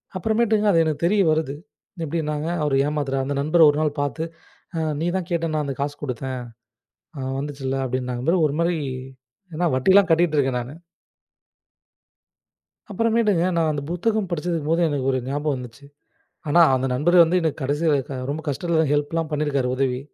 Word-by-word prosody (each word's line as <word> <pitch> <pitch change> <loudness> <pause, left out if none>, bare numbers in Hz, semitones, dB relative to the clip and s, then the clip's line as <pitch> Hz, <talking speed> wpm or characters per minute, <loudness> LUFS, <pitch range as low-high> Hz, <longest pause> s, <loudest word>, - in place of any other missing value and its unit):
அப்புறமேட்டுங்க 220 +2 +1
அது 165 -3 +4
எனக்கு 155 -1 -2
தெரிய 200 +3 +3
வருது. 155 -3 -1 0.5
எப்டின்னாங்க, 150 -1 -2 0.2
அவரு 145 -2 +1
ஏமாத்தறான் 140 -3 -1
அந்த 140 +1 -2
நண்பர 155 +4 +2
ஒரு 145 - 0
நாள் 150 -1 -1
பாத்து 145 +3 -2 0.5
"அ - - -1 0.2
நீதான் 175 +2 -1
கேட்டன்னு 165 -2 -1
நான் 150 -1 0
அந்த 135 - -3
காசு 145 +1 -2
குடுத்தேன், 130 -1 -4 0.8
அ - - -6 0.2
வந்துச்சில்ல" 135 -2 -4
அப்படின்னாங்க 125 -1 -3
பாரு, 175 -1 +3
ஒருமாறி 170 +4 0 0.8
ஏன்னா 175 +3 -1
வட்டிலாம் 190 +8 +4
கட்டிட்டு 165 -1 +3
இருக்கேன் 135 -3 +1
நானு. 125 +4 -8 2.2
அப்புறமேட்டுங்க, 215 -4 +2
நான் 165 -1 +2
அந்த 145 -1 -3
புத்தகம் 210 +3 0
படிச்சது 170 0 -1
போது 165 +2 +2
எனக்கு 140 -3 -2
ஒரு 130 - 0
ஞாபகம் 145 +1 -1
வந்துச்சு. 125 +2 -10 0.6
ஆனா 170 +4 +4
அந்த 130 0 0
நண்பர் 170 +7 +5
வந்து 175 +3 +1
என்ன 160 -2 +1
கடைசி 145 +4 -1
வ - - +4 0.3
ரொம்ப 155 +2 -4
கஷ்டத்துல 160 +2 0
ஹெல்ப்லாம் 155 +2 -1
பண்ணிருக்காரு, 145 -4 0
உதவி 130 -1 0
150 Hz, 155 wpm, -23 LUFS, 140-170 Hz, 2.2 s, நண்பர்